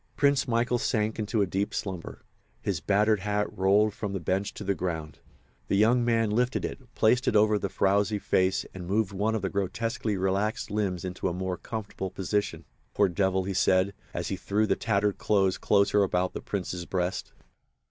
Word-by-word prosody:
Prince 140 -1 +3
Michael 120 +1 +1
sank 110 -1 0
into 105 -1 +1
deep 95 +2 -2
slumber. 95 -4 -5 0.4
His 95 -5 -2
battered 105 +3 +2
hat 105 +1 -1
rolled 100 +3 +3
from 105 -1 -4
the 95 - -2
bench 95 +4 -1
to - - -6
the 100 - +1
ground. 80 -5 -4 0.5
The 100 - +1
young 120 +4 +4
man 115 -2 +2
lifted 125 +4 +1
it, - - -5 0.2
placed 120 +3 +3
it - - +2
over 105 0 +4
the - - -2
frowsy 100 +2 +2
face 95 -1 +1
and 90 -2 -7
moved 100 +1 +1
one 105 +3 0
of 105 - -3
the 95 - 0
grotesquely 110 +2 -2
relaxed 95 +3 -1
limbs 95 -4 -1
into 90 0 -3
a - - -3
more 90 0 -2
comfortable 105 -2 -5
position. 95 -3 -2 0.3
"Poor 100 -2 +4
devil!" 95 +1 +1
he 95 +1 -3
said, 95 +1 +3 0.2
as - - -3
he - - -2
drew 105 +2 0
the - - +1
tattered 105 -2 0
clothes 95 -3 +2
closer 100 +1 +3
about 90 -1 +1
the - - -5
Prince's 90 -3 -4
breast. 90 0 -2
100 Hz, 185 wpm, -28 LUFS, 95-110 Hz, 0.5 s, young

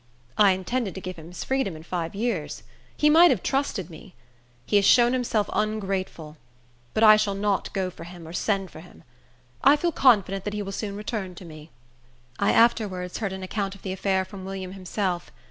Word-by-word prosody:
I 200 -2 +5
intended 195 +2 -3
to - - -5
give 185 -1 -6
him 160 0 -11
his 180 - -7
freedom 265 -10 -1
in 155 - -10
five 170 0 -4
years. 210 -7 -3 0.3
He 300 - +3
might 330 +3 +7
have 230 - 0
trusted 255 - -1
me. 170 +4 -13 0.5
He 205 - +3
has 200 - +3
shown 240 +2 +5
himself 230 -5 0
ungrateful; 195 -7 -3 0.6
but 220 - +2
I 215 -1 +9
shall 210 -2 0
not 200 -1 -1
go 190 -2 -2
for - - -11
him, 170 -1 -11
or 165 - -9
send 195 -1 -1
for - - -11
him. 175 +2 -15 0.6
I 280 - +7
feel 340 +3 0
confident 200 - +3
that 210 0 -3
he 210 - -2
will 195 - -6
soon 200 0 -4
return 205 -3 -5
to 180 - -11
me." 155 -1 -12 0.7
I - - +3
afterwards 205 -6 +2
heard 205 -4 -2
an 190 0 -6
account 195 +1 -3
of 200 - -17
the 190 - -3
affair 190 0 0
from 190 0 -10
William 190 -1 -6
himself. 185 -1 -3
195 Hz, 200 wpm, -25 LUFS, 185-215 Hz, 0.7 s, I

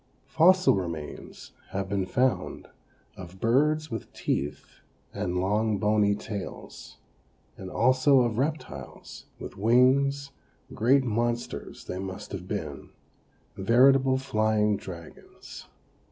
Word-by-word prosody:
Fossil 185 +3 +4
remains 85 -6 -6 0.2
have 95 0 -3
been 95 -1 -2
found 130 +4 -1 0.5
of 95 0 -11
birds 150 +7 +1
with 115 -2 -6
teeth 70 0 -4 0.3
and 90 0 -2
long 105 +3 +1
bony 105 -1 +2
tails, 100 -2 -8 0.6
and 95 - -8
also 130 +4 +4
of 120 -2 0
reptiles, 150 +3 -5
with - - -9
wings; 135 +5 +3 0.4
great 130 +5 +3
monsters 120 0 -3
they 90 - -5
must 95 -1 -7
have - - -6
been - - -5 0.7
veritable 130 +6 +4
flying 110 -5 +1
dragons. 85 -4 -11
115 Hz, 105 wpm, -27 LUFS, 95-130 Hz, 0.7 s, Fossil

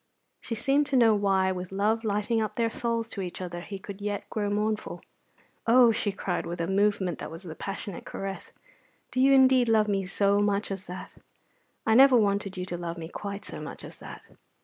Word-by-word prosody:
She 230 - -5
seemed 275 +5 +2
to 280 - -1
know 230 -3 +6
why, 195 -2 +2
with 180 -1 -5
love 215 +4 +1
lighting 215 +2 0
up 215 - -3
their 230 -2 0
souls 230 -1 -2
to 200 - -4
each 180 -2 -6
other, 175 -1 -5
he 195 +2 -7
could 195 +1 -9
yet 205 -1 -3
grow 205 -2 -1
mournful. 210 +1 -1 0.7
"Oh," 240 0 +7
she 215 -2 -1
cried, 190 -2 -3
with 175 +1 -5
a 170 - 0
movement 195 -2 +1
that - - -6
was 165 +4 -10
a 160 - -6
passionate 195 +2 -6
caress, 195 0 -6 0.6
"do 255 - 0
you 270 +1 +6
indeed 260 -2 +5
love 215 -1 +4
me 195 -2 0
so 200 +1 +2
much 205 0 0
as 195 0 -6
that? 180 +1 -8 0.7
I 220 - +3
never 260 +1 +7
wanted 200 -2 0
you 180 - -3
to 175 -1 -5
love 170 0 -5
me 165 -1 -7
quite 200 +2 -6
so - - -8
much - - -8
as - - -10
that!" - - -10
205 Hz, 210 wpm, -27 LUFS, 190-225 Hz, 0.7 s, Oh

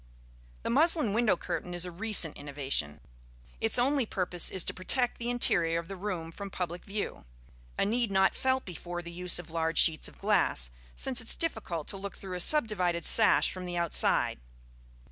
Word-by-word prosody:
The - - -2
muslin 300 - +3
window 220 -4 +2
curtain 180 +1 -5
is 175 0 +3
a 180 - -6
recent 190 -3 0
innovation. 135 - -2 0.6
Its - - +2
only 260 0 +1
purpose 180 -3 +2
is 185 - 0
to - - -1
protect 245 +6 0
the 235 0 -3
interior 175 -9 +2
of 170 +1 -6
the 195 - -6
room 180 -4 -5
from 200 +3 -8
public 175 -2 -5
view: 200 - -5 0.5
a - - +2
need 235 +2 +1
not 190 -1 +3
felt 260 0 -1
before 175 -1 -7
the 170 - -8
use 180 0 +1
of 175 -2 -7
large 165 0 -1
sheets 160 -2 +3
of - - -12
glass, - - +1 0.2
since 255 -2 0
it 225 - -10
is - - +5
difficult 205 - -2
to 195 - -3
look 200 0 -7
through 190 -2 -8
a - - -4
subdivided 180 - +2
sash 220 - +4
from 185 -1 -7
the 175 -1 -4
outside. 170 - +2
185 Hz, 185 wpm, -29 LUFS, 170-225 Hz, 0.6 s, is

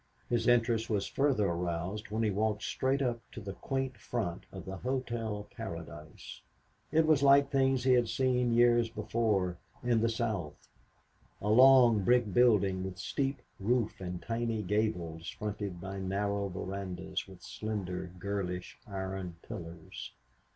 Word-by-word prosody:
His 120 - +1
interest 115 -2 +3
was 100 -3 +1
further 135 -7 +2
aroused 85 +3 -2
when 110 +2 -1
he 110 - +2
walked 105 +1 0
straight 135 +1 0
up 120 -2 0
to - - -6
the 100 -2 -6
quaint 135 0 -3
front 100 -7 -3
of - - -8
the 95 0 -5
Hotel 115 -4 -3
Paradise. 85 -8 -8 0.5
It 160 +1 +4
was 155 -3 +4
like 140 0 +6
things 135 -2 +2
he 130 0 +5
had 120 -2 +3
seen 125 0 +2
years 120 -1 +5
before 105 -5 0 0.2
in 120 -2 +2
the 115 - +3
South; 110 -9 -3 0.7
a 105 - -2
long, 120 -2 +7
brick 120 -3 +3
building 100 -6 +4
with 95 -1 -5
steep 135 +9 -2 0.2
roof 115 0 0
and 90 -1 -4
tiny 115 -1 -1
gables 90 -5 -1
fronted 100 -3 -4
by 95 +2 -5
narrow 100 +1 -1
verandas 95 0 -4
with 95 -2 -14
slender, 95 -5 -4
girlish, 90 -1 -4
iron 95 -3 -4
pillars. 85 -1 -8
105 Hz, 145 wpm, -32 LUFS, 95-120 Hz, 0.7 s, long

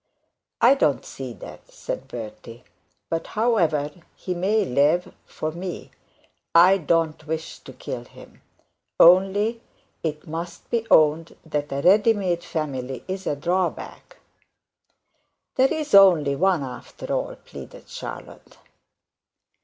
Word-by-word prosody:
'I 240 +3 +7
don't 155 - +1
see 130 -2 -7
that,' - - -12
said - - -6
Bertie. 115 +1 -9 0.4
'But 165 0 -3
however, 165 -11 +1 0.2
he 185 - -4
may 200 +4 +1
live 150 +5 +1
for 155 - -4
me 175 +2 -7 0.6
I 185 +3 +7
don't 160 -1 0
wish 160 +1 -5
to - - -12
kill - - -7
him; - - -16 0.6
only, 195 +6 +5 0.4
it 155 -2 -4
must 170 +2 -6
be 230 -1 -1
owned 155 +1 +3
that 150 -2 -3
a 140 0 -2
ready 210 +4 +5
made 180 -5 -2
family 135 -5 -4
is 190 0 -5
a - - 0
drawback.' 175 +4 -3 1.4
'There 265 +1 +3
is 310 -5 -3
only 175 -8 +6
one 180 -1 +2
after 125 -2 -7
all,' - - -2
pleaded - - -11
Charlotte. - - -9
170 Hz, 120 wpm, -23 LUFS, 150-195 Hz, 1.4 s, I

